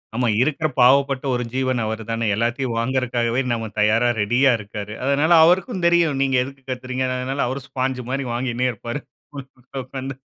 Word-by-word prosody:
ஆமா 125 0 +1
இருக்குற 155 +3 +1
பாவப்பட்ட 135 +1 +4
ஒரு 125 0 -1
ஜீவன் 130 -1 0
அவர் 110 +1 -3
தானே, 115 0 -1
எல்லாததையும் 120 +2 -1
வாங்குறக்காகவே 120 -1 0
நாம 115 -1 -2
தயாரா 115 +3 +3
ரெடியா 125 +6 +3
இருக்காரு. 105 0 -7
அதனால 145 +4 +2
அவருக்கும் 185 +3 +1
தெரியும். 170 -5 +2
நீங்க 135 -1 +1
எதுக்கு 135 +1 -11
கத்துறீங்க. 130 0 -3
அதனால 135 +1 -1
அவரும் 135 +1 -5
ஸ்பான்ஜ் 130 0 -2
மாரி 135 0 -2
வாங்கினே 125 0 -1
இருப்பாரு. 120 +6 -6 0.3
உள்ள 140 - -6 0.4
உக்கார்ந்து. 135 0 -6
130 Hz, 155 wpm, -21 LUFS, 120-135 Hz, 0.4 s, பாவப்பட்ட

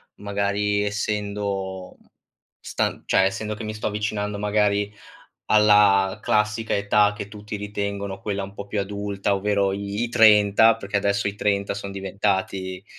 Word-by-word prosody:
Magari, 100 0 -1
essendo 100 -2 -3 0.6
stan - - -2
cioè, - - +3
essendo 105 +2 -2
che 110 - -8
mi 110 0 -4
sto 105 - -3
avvicinando, 105 -1 -2
magari, 105 0 +1 0.6
alla 105 -2 +5
classica 105 +2 0
età 105 +1 +3
che 100 - -6
tutti 105 0 -7
ritengono 100 -1 -4
quella 100 -2 -3
un 100 - -10
po' 100 - -7
più 100 0 -2
adulta. 100 0 -2
Ovvero 100 0 +1
i 100 +2 -3
i - - -3
30 110 0 +6
perché 100 -2 -4
adesso 100 0 0
i 100 - -5
30 100 -1 0
son 100 0 -6
diventati 95 -1 -2
100 Hz, 145 wpm, -23 LUFS, 100-105 Hz, 0.6 s, 30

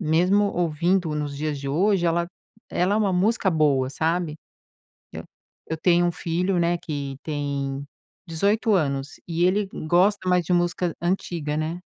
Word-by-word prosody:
Mesmo 180 +5 +3
ouvindo 170 0 0
nos 145 -1 -3
dias 150 0 -2
de 140 - -4
hoje 185 +5 +2
ela 170 +1 +1 0.4
ela 185 +3 +1
é - - +2
uma 205 -3 +1
música 200 +3 +2
boa, 145 -5 +2
sabe, 160 +1 -1 0.8
eh, - - -5 0.5
eu 160 - -3
tenho 175 +1 +3
um - - +1
filho, 175 +3 -1
né, 170 0 +2
que 140 -4 -5
tem 140 -2 -3 0.4
18 205 +7 +1
anos 140 -6 -1
e 170 0 0
ele 195 +2 +2 0.2
gosta 185 +3 +3
mais 180 -1 +2
de 180 - 0
música 175 0 0
antiga, 170 -4 -2
né 160 +3 -3
170 Hz, 155 wpm, -24 LUFS, 150-180 Hz, 0.8 s, Mesmo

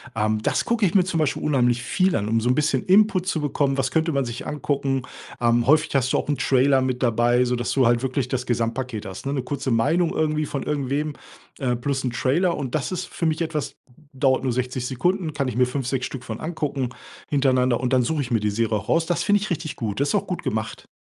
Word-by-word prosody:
ähm, 110 0 0
das - - 0
gucke 235 -2 0
ich 190 - 0
mir 190 - +6
zum 175 -2 -2
Beispiel 155 -3 0
unheimlich 125 -4 +2
viel 185 +4 +1
an, 105 - -1
um 115 +1 +1
so 120 - 0
'n 125 - +3
bisschen 145 -3 +1
Input 190 -1 +4
zu 170 - 0
bekommen: 140 -2 0
„Was 130 -1 0
könnte 160 +3 +1
man 140 -1 +1
sich 120 +3 -6
angucken?” 140 -3 -1 0.4
Ähm, 120 0 +2
häufig 155 0 +3
hast 130 -1 +2
du - - +2
auch - - -2
'n 145 -1 0
Trailer 135 +1 +3
mit 130 -1 -1
dabei, 120 +1 +3
so 125 0 0
dass 120 0 -2
du 135 -2 +3
halt 120 0 +3
wirklich 130 -1 -1
das 125 -1 -2
Gesamtpaket 115 -1 -2
hast, 95 +7 -7
ne, 140 - -1
'ne 135 -3 -2
kurze 140 +1 -3
Meinung 155 +9 +2
irgendwie 155 -1 0
von 140 - -4
irgendwem, 145 +1 -1 0.5
ähm, 125 -3 0
plus 135 0 -1
'n 130 - 0
Trailer. 165 +9 +1
Und 130 -4 -4
das 155 +1 -1
ist 185 0 -3
für 170 - -2
mich 160 +1 -1
etwas 155 -3 -3 0.4
dauert 130 -1 +2
nur 130 -2 0
60 125 0 -2
Sekunden, 165 +6 -1
kann 140 -2 -1
ich 125 - -3
mir 125 +1 +4
5, 125 0 -3
6 130 -1 -1
Stück 130 -2 -6
von 110 -3 -6
angucken 145 -5 -2 0.4
hintereinander. 130 -4 +2
Und 125 +1 -1
dann 130 -1 +4
suche 150 +4 0
ich 125 - -4
mir 115 - +3
die 105 0 0
Serie 110 +1 0
auch 100 - -8
raus. 165 0 +3
Das 175 - 0
finde 205 0 +3
ich 210 - -3
richtig 165 -3 -3
gut. 105 -4 -3
Das 140 +1 +1
ist - - +1
auch 200 - 0
gut 180 - -4
gemacht. 110 -6 -3
135 Hz, 250 wpm, -23 LUFS, 125-155 Hz, 0.5 s, mir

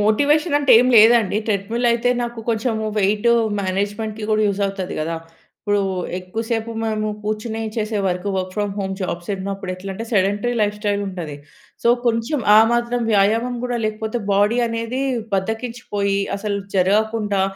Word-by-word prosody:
Motivation 290 +9 +3
అంటే 285 -2 +4
ఏమి 250 +1 +2
లేదండి. 220 -2 +6
ట్రెడ్‌మిల్ 220 +3 -1
అయితే 240 +1 +1
నాకు 235 -1 -5
కొంచెము 220 -1 -1
వెయిటు 210 +4 +3 0.3
మేనేజ్మెంట్‌కి 205 +3 -2
గూడా 215 0 +3
యూజ్ 200 0 -2
అవుతది 195 -2 -4
గదా! 165 +2 -2 0.5
ఇప్పుడు 205 -1 +1 0.4
ఎక్కువ 185 +5 -5
సేపు 230 0 -1
మనము 215 -1 -1 0.2
కూర్చొని 215 +1 -3 0.2
చేసే 215 -1 -1
work. 180 +1 -2
Work 185 0 -3
from 205 -1 -1
home 190 -1 -2
jobs 175 -1 -4
ఉన్నప్పుడు 195 -1 -4
ఎట్లా 190 +2 -7
అంటే, 225 +4 -5
సెడెంటరీ 205 +4 +1
లైఫ్‌స్టైల్ 205 0 -1
ఉంటది. 170 -6 -6 0.5
సో, - - +3 0.2
కొంచెం 235 +5 0 0.2
ఆ - - +9
మాత్రం 240 0 0
వ్యాయామం 225 +5 +2
గూడా 245 -1 -1
లేకపోతే, 220 +2 -2
బాడీ 205 +4 +3
అనేది 230 +3 -3 0.3
బద్ధకించిపోయి, 205 -1 -2 0.2
అసలు 200 0 -2 0.2
జరగకుండా, 205 +1 +1
215 Hz, 145 wpm, -20 LUFS, 195-230 Hz, 0.5 s, ఆ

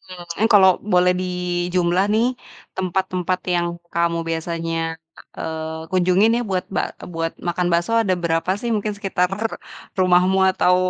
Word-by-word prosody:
Mmm, 175 +5 -2
kalau 190 -2 +8 0.2
boleh 180 0 +5
dijumlah 180 0 0
nih, 225 +2 +3 0.5
tempat-tempat 185 -1 -1 0.2
yang 175 0 +1 0.3
kamu 170 0 +1
biasanya, 165 0 -2 0.6
eee, 160 0 -4
kunjungin 185 +4 +4
ya 240 - 0
buat 185 -1 0
ba - - -2 0.2
buat 165 0 -2 0.2
makan 175 +1 0
bakso 170 +6 +1
ada 195 -5 +1
berapa 165 +2 0
sih? 240 - -3
Mungkin 210 0 -1
sekitar-r 195 +2 -1 0.5
rumahmu 185 +1 +4
atau, 180 -1 +3
180 Hz, 130 wpm, -21 LUFS, 170-190 Hz, 0.6 s, kalau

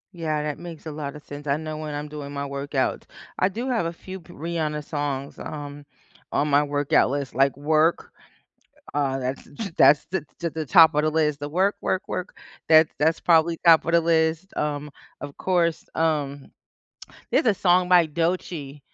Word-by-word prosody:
Yeah, 155 -3 -2
that 150 -1 -4
makes 170 -2 -9
a 160 - -5
lotta 150 -1 -6
sense, 145 0 -10
I 140 - +2
know 155 0 -5
when 155 -1 -5
I'm 145 +1 -5
doing 145 -1 -7
my 140 0 -3
workout. 140 -1 -2 0.3
I 185 - +4
do 235 +7 -4
have 230 -9 0
a 165 - -3
few 185 +2 -9
p 175 0 -16
Rihanna 155 -2 -3
songs, 145 -2 -4
um, 145 -1 -7 0.5
on 150 - +1
my 145 +1 +4
workout 145 -2 +2
list, 140 0 -3
like, 135 +2 +2
Work, 155 +3 +1 0.8
uh, 135 -2 0
that's 130 +1 -4 0.3
that's 145 0 +6
the 190 -4 -2 0.3
the 160 0 -5
top 165 -1 +7
of 150 - +2
the 155 - +2
list, 150 -2 0
the 145 - -4
“work, 190 +6 +1
work, 190 - -1
work,” 185 - -5 0.3
that's 155 -1 +6
that's 160 +2 +2
probably 165 0 +3
top 165 -2 +7
of 170 - 0
the 170 - +5
list, 165 +2 +1
um, 150 0 -2 0.3
of 145 -1 -8
course, 170 -3 0
um, 145 -4 -1 0.8
there's - - +2
a 220 - +4
song 180 -1 +3
by 180 -2 +6
Doechii 165 -3 -3
155 Hz, 180 wpm, -24 LUFS, 145-170 Hz, 0.8 s, top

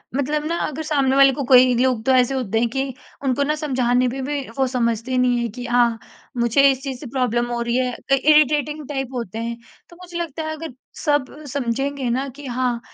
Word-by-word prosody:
मतलब 295 +2 -1
ना 340 +1 -1
अगर 305 +2 -5
सामने 275 -3 +1
वाले 275 0 +7
को 280 - -3
कोई 255 0 +6
लोग 250 -3 +1
तो 265 - +3
ऐसे 255 +1 +3
होते 225 -4 -1
हैं 235 0 +1
कि 270 +1 -2 0.3
उनको 270 +1 +1
ना 300 +2 0
समझाने 255 -4 +1
में 265 +2 -4
भी 290 +1 -2 0.2
वो 265 - +3
समझते 240 0 -1
नहीं 250 -1 +3
हैं 235 -1 -2
कि 245 +2 -7
हाँ 240 -1 +2 0.4
मुझे 240 +4 +4
इस 265 0 -4
चीज़ 265 -3 -5
से 290 - -9
प्रॉब्लम 240 -2 0
हो 235 0 -2
रही 235 0 -1
है, 250 -1 0
अ, 275 - -3
इरिटेटिंग 300 0 +3
टाइप 270 -3 -3
होते 230 -4 -5
हैं। 235 0 -4 0.3
तो 345 - -15
मुझे 350 -1 -8
लगता 325 -2 -4
है 315 - -3
अगर 315 -4 -7 0.3
सब 290 -4 +1 0.2
समझेंगे 270 0 -2
ना 265 +3 -1
कि 290 - -9
हाँ 245 -1 -1
260 Hz, 220 wpm, -21 LUFS, 245-285 Hz, 0.4 s, वाले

